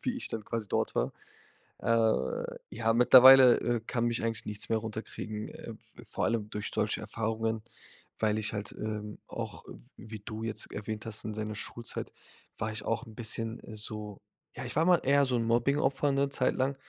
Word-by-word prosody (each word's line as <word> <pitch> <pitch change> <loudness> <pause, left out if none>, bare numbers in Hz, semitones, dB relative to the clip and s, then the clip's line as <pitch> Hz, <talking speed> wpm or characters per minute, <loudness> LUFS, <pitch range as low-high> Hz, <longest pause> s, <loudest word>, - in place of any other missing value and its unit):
wie 255 -1 -1
ich 255 - -3
dann 110 -2 -5
quasi 115 -1 -3
dort - - 0
war. - - +1 0.7
Äh, 110 - +1 0.2
ja, 115 0 +1
mittlerweile, 130 +1 +9
äh, 120 -1 0
kann 120 0 -1
mich 120 -1 -1
eigentlich 115 -1 -2
nichts 105 -1 -4
mehr 115 - +2
runterkriegen, 110 -1 -5
äh, - - -9
v - - -17
vor - - -1
allem 110 -2 -1
durch 105 0 -3
solche 105 0 0
Erfahrungen, 110 +1 -2 0.6
weil 110 -1 +1
ich 105 - 0
halt, 100 -1 -4
ähm, 105 -1 -5
auch, - - -6
w - - -9 0.2
wie 110 -1 -9
du 110 +2 -7
jetzt 110 -1 -3
erwähnt 105 +1 -5
hast, 110 -1 -2
in 110 - -3
deiner 110 0 -4
Schulzeit 115 +2 -4 0.5
war 110 -1 -2
ich 110 -1 -4
auch 115 +3 -1
'n 110 - -12
bisschen 115 0 -2
so 105 -1 -6 0.3
ja, - - -6
ich - - -6
war 160 +3 +3
mal 180 -1 +5
eher 140 +1 +4
so 125 - +1
'n 115 - 0
Mobbing-Opfer 135 +4 +2
'ne 140 0 +1
Zeit 130 -2 +1
lang. 135 +2 0
115 Hz, 190 wpm, -30 LUFS, 110-120 Hz, 0.7 s, mittlerweile